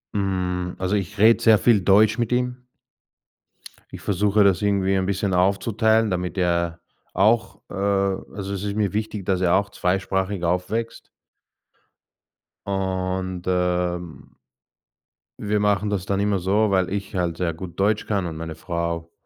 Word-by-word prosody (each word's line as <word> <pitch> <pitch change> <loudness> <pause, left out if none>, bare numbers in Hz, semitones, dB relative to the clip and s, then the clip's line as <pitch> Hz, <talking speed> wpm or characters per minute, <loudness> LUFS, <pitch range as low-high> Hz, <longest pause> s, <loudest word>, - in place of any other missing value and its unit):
Hm, 90 -2 -2
also, 95 +2 -1
ich 95 -2 -3
rede 110 +3 +5
sehr 110 -1 +6
viel 110 -4 +3
Deutsch 105 +4 +4
mit 120 0 -1
ihm. 125 0 -2 1.2
Ich - - -9
versuche, 105 +1 +2
das 95 -2 +3
irgendwie 100 -1 +1
ein 95 - 0
bisschen 100 0 -1
aufzuteilen, 105 +4 +2
damit 90 0 -3
er 85 -1 0 0.3
auch, 110 +4 +2
äh - - -10
also, 100 0 -2
es 100 0 -4
ist 100 0 -3
mir 105 -2 0
wichtig, 105 -2 -3
dass 95 -1 0
er 90 0 +3
auch 100 +1 +1
zweisprachig 95 0 -1
aufwächst. 90 +7 -2 1.6
Und, 95 -1 -2
ähm 90 -2 -2 1.0
wir 105 0 0
machen 105 0 +1
das 100 -2 -2
dann 100 0 -1
immer 100 -1 +1
so, 100 +4 +2
weil 95 -2 +1
ich 100 -1 -5
halt 85 -2 -1
sehr 85 -2 -1
gut 90 +2 -9
Deutsch 105 +2 +1
kann 100 -4 -1
und 80 -1 -6
meine 80 -1 -6
Frau 85 0 -4
95 Hz, 150 wpm, -23 LUFS, 90-105 Hz, 1.6 s, sehr